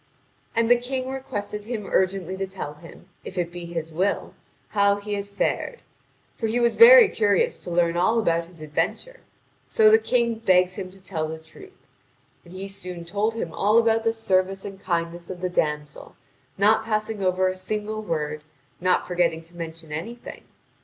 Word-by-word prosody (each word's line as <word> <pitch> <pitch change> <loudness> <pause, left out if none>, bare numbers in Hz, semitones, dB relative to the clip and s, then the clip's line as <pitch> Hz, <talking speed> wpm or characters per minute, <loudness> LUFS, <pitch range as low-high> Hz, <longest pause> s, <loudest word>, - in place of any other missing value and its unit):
And 230 0 +2
the 245 +1 +6
King 260 +1 -3
requested 210 -6 -5
him 220 -3 -4
urgently 190 -1 0
to 195 0 -2
tell 185 -6 -6
him, 165 +3 -15 0.2
if 190 - -9
it 175 -1 -1
be 175 0 -7
his 165 -1 -5
will, 190 +5 -1 0.4
how 200 -1 +3
he 205 +1 -5
had 200 0 -3
fared; 205 - -2 0.5
for 225 - -2
he 230 +3 0
was 235 -1 +2
very 480 -1 +10
curious 205 - +1
to - - -6
learn 170 -1 +2
all 185 +7 +2
about 170 -6 +1
his 170 -2 -15
adventure; - - -3 0.5
so 435 -1 +5
the 445 - +7
King 235 - 0
begs 185 -4 +3
him 185 -1 -6
to 190 0 -15
tell 165 -4 -3
the 160 +1 -5
truth. 160 - -16 0.6
And 170 - -16
he 195 +1 -5
soon 180 -3 -7
told 205 +5 -1
him 170 -8 -4
all 210 +3 +3
about 225 -1 +3
the 225 - +2
service 195 -3 0
and 195 -1 -8
kindness 170 -1 -3
of 185 -1 -6
the 180 0 -2
damsel, 150 -4 -2 0.4
not 210 +3 +4
passing 215 -1 -2
over 185 0 +2
a 185 - -1
single 210 +3 -3
word, 150 -6 -3 0.4
not 180 0 +2
forgetting 175 -2 0
to 170 +2 -17
mention 165 -2 -7
anything. 225 +11 -7
190 Hz, 180 wpm, -24 LUFS, 170-220 Hz, 0.6 s, very